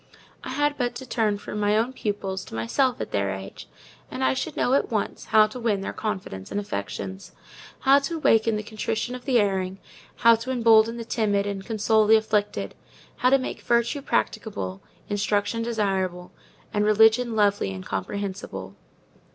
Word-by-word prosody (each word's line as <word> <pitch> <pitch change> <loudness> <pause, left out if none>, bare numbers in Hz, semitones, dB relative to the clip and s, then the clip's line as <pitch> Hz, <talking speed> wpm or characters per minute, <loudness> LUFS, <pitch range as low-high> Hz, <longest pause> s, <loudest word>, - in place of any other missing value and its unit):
I - - -6
had 290 +2 0
but 245 -1 -1
to 260 - -7
turn 220 -4 0
from 210 +1 -6
my 210 +1 +2
little 230 +3 +1
pupils 195 -5 -3
to - - -9
myself 245 - +1
at - - -5
their 100 -1 0
age, 95 0 -7 0.4
and 130 - -4
I 130 0 +3
should 130 - -4
know, 250 - +2
at 275 - +2
once, 215 -3 -2
how 215 -1 +5
to 215 +4 -7
win 215 -5 0
their - - -4
confidence 190 - -5
and 205 - -2
affections: 185 - -5 0.5
how 275 +1 +6
to 305 +4 -3
waken 225 -7 +3
the 210 - -3
contrition 220 +2 -3
of 250 -1 -8
the 250 -3 +3
erring; 190 -2 0 0.4
how 230 -1 +6
to 230 +3 -7
embolden 230 -2 +4
the 230 - -6
timid 205 -3 0
and 200 -1 -4
console 220 -1 +2
the 220 - +7
afflicted; 215 -1 0 0.4
how 250 - +3
to 275 - +6
make 260 - -5
Virtue 235 +4 +1
practicable, 95 - -2 0.3
Instruction 205 +2 0
desirable, 190 -6 -1 0.4
and 210 - +1
Religion 220 +3 +4
lovely 205 - +2
and 95 -1 -7
comprehensible. 100 - -5
210 Hz, 175 wpm, -25 LUFS, 190-235 Hz, 0.5 s, the